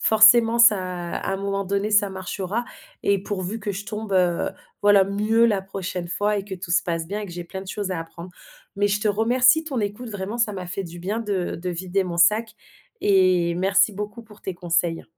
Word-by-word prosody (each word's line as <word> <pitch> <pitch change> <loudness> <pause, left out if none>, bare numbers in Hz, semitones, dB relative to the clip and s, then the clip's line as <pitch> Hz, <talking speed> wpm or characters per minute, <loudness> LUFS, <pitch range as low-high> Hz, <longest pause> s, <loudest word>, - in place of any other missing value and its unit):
forcément 225 +1 +6
ça 235 -3 +7
à 180 -1 -4
un 195 - -1
moment 200 0 -2
donné, 200 +2 -1
ça 210 -1 +4
marchera 190 +4 -4 0.4
et 200 -1 +2
pourvu 200 +2 -4
que 205 - -3
je 200 +1 -6
tombe, 215 0 -5
heu, 180 -2 +2 0.3
voilà, 205 -1 +6
mieux 210 +4 +2
la 200 -4 +1
prochaine 185 -2 -5
fois 205 +4 0
et 195 - -3
que 195 -2 -6
tout 175 -1 -5
se 175 - +3
passe 165 -2 -3
bien 205 +5 -4
et 210 - -5
que - - -10
j'ai 175 0 -6
plein 190 +2 -7
de 195 - -12
choses 200 -1 -3
à 170 - -3
apprendre, 170 +2 -10 0.4
mais 205 +1 +1
je 205 +1 0
te 215 - -1
remercie, 245 +8 +4
ton 285 -5 -4
écoute, 210 +3 -3
vraiment, 205 +2 -5
ça 230 -3 +1
m'a 185 -2 -6
fait 180 +3 -4
du 175 -1 -9
bien 205 +6 -3
de 200 -5 -2
de 180 +2 -4
vider 185 +2 -1
mon 175 -2 -5
sac 215 +6 +3 0.4
et 185 -3 +3
merci 195 +3 +3
beaucoup 210 +3 -6
pour 210 -1 -17
tes 190 - -4
conseils. 170 -1 -1
195 Hz, 220 wpm, -23 LUFS, 180-210 Hz, 0.4 s, ça